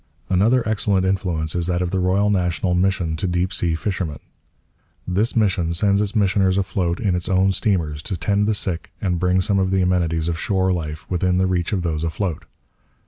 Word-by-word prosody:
Another 110 +6 +3
excellent 100 -3 +1
influence 90 -5 -1
is 85 -1 -1
that 90 0 0
of 90 - -3
the 95 - 0
Royal 95 +3 +2
National 90 -1 0
Mission 90 -3 +1
to 95 - -2
Deep 90 +1 -1
Sea 85 -2 +1
Fishermen. 85 -4 -3 0.9
This 100 +6 0
mission 95 -6 +1
sends 100 +2 +2
its 105 +2 -2
missioners 95 -2 +2
afloat 90 -3 -1
in 100 -5 0
its 90 -1 -2
own 95 +1 +3
steamers 85 -8 -1
to 90 +4 -4
tend 100 +6 +1
the 110 - +1
sick 90 -4 -3
and 90 -3 -1
bring 90 +1 +2
some 100 0 +1
of 95 -1 +1
the 95 -1 +2
amenities 85 -3 +1
of 85 -1 -2
shore 95 -1 +1
life 80 -2 -5
within 90 0 0
the 95 - +2
reach 90 -2 -1
of 95 -4 -1
those 80 -2 -2
afloat. 85 +1 -3
90 Hz, 195 wpm, -21 LUFS, 85-100 Hz, 0.9 s, Another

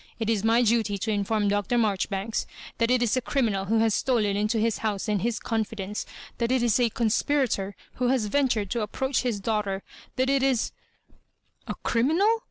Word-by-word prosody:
It 225 -1 0
is 215 -3 0
my 230 +2 +4
duty 220 -3 +2
to 220 +3 -2
inform 205 0 0
Dr. 205 +4 +1
Marjoribanks 205 -1 -1 0.3
that 230 0 +2
it 250 -1 +3
is 230 -1 +1
a 255 - +1
criminal 225 -7 0
who 225 +3 +1
has 225 -2 +3
stolen 215 -6 +1
into 210 +3 0
his 220 -1 +1
house 210 -1 -2
and 210 -3 0
his 235 0 -1
confidence— 215 -3 -3 0.3
that 235 0 0
it 260 -2 +2
is 235 0 +3
a 240 -2 +3
conspirator 225 -3 0 0.2
who 250 - +1
has 250 -3 +2
ventured 220 -4 0
to 235 - 0
approach 265 +5 -1
his 240 -5 -1
daughter 200 -2 -1 0.3
^that 260 0 +2
it 275 0 +2
is—" 260 -4 +1 0.5
" - - -42
A'criminal? 335 - +1
225 Hz, 185 wpm, -26 LUFS, 205-245 Hz, 0.5 s, my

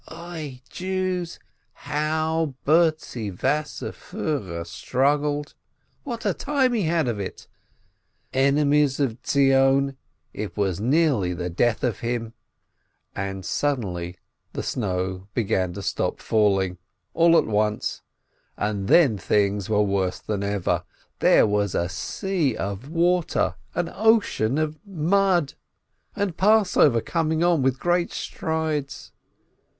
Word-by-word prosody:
Oi, 160 -6 -8
Jews, 185 -2 -3 0.4
how 155 0 -1
Bertzi 155 -8 +2
Wasserfiihrer 130 - -3
struggled, 145 - 0 0.5
what 235 -5 -6
a - - +2
time 270 -3 +1
he 225 - +1
had 160 -3 +1
of 115 -4 -2
it! 100 - -6 0.9
Enemies 140 +1 +3
of 125 -5 0
Zion, 135 0 +3 0.4
it 105 0 -6
was 95 -4 0
nearly 125 - +2
the 90 0 -4
death 115 +6 +1
of 120 -6 0
him! 115 -1 -3 0.8
And 95 -1 -4
suddenly 90 -13 -2 0.4
the - - -4
snow 95 -3 -2
began 95 -6 0
to 100 - -7
stop - - -1
falling, 95 -4 +1 0.3
all 170 0 +5
at - - +3
once, 105 0 -1 0.6
and 100 -2 -2
then 130 - +5
things 100 +1 +1
were 105 -1 +3
worse 95 -2 0
than 105 -2 -4
ever 100 -2 -1 0.2
— - - -38
there - - +5
was 105 -2 0
a 85 - +1
sea 155 - -1
of 100 +7 -4
water, 175 +1 +1 0.2
an 175 0 0
ocean 210 - +2
of 155 0 -1
mud. 185 -3 +1 0.6
And 200 -5 -1
Passover 190 - +4
coming 160 +2 0
on 175 -4 +3
with 130 0 +1
great 175 0 +1
strides! 160 -3 -3
135 Hz, 120 wpm, -24 LUFS, 105-165 Hz, 0.9 s, all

